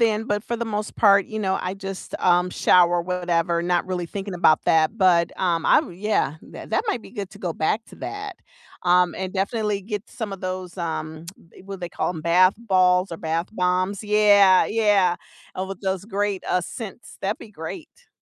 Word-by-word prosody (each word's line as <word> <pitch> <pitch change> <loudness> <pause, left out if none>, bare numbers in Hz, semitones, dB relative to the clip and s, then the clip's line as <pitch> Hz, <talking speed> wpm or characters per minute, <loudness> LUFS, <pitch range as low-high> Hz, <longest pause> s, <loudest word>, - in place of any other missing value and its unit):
then, 220 -1 +2
but 205 -2 -1
for 235 - -3
the 235 - -3
most 210 -1 -4
part, 200 -2 +5
you 220 - -5
know, 190 -2 0
I 180 +1 -3
just, 195 -1 -7
um, 180 0 +3
shower, 175 -1 +4
whatever, 170 -1 0
not 175 0 0
really 180 -2 -3
thinking 195 +1 -6
about 155 -3 +3
that. 160 +6 +3
But, 180 -4 +3
um, 170 -3 0
I - - +6
yeah, 185 -5 -1
that - - -11
that 440 - +1
might 245 - -1
be - - -13
good 200 -5 -6
to - - -14
go 175 -3 -3
back 205 +9 -1
to - - -15
that, 410 -2 -6 0.5
um, 180 -1 +3
and 185 -1 -4
definitely 205 +1 -1
get 210 +3 -6
some 220 -5 -6
of 195 - -7
those, 185 -1 -5
um, 160 -2 -4 0.4
what 195 0 -7
do - - -17
they 175 - -4
call - - -2
'em 165 -3 -6
bath 180 +4 +4
balls 185 -4 +2
or - - -4
bath 165 +2 -2
bombs. 185 0 0
Yeah, 205 -3 +5
yeah, 205 -5 +2 0.4
and 190 +1 -4
with 195 - -7
those 190 -1 -2
great 205 -2 -2
uh 180 - +2
scents, 220 +5 -9
that'd 200 +2 -2
be 220 - -12
great. 315 - -9
190 Hz, 200 wpm, -23 LUFS, 175-210 Hz, 0.5 s, I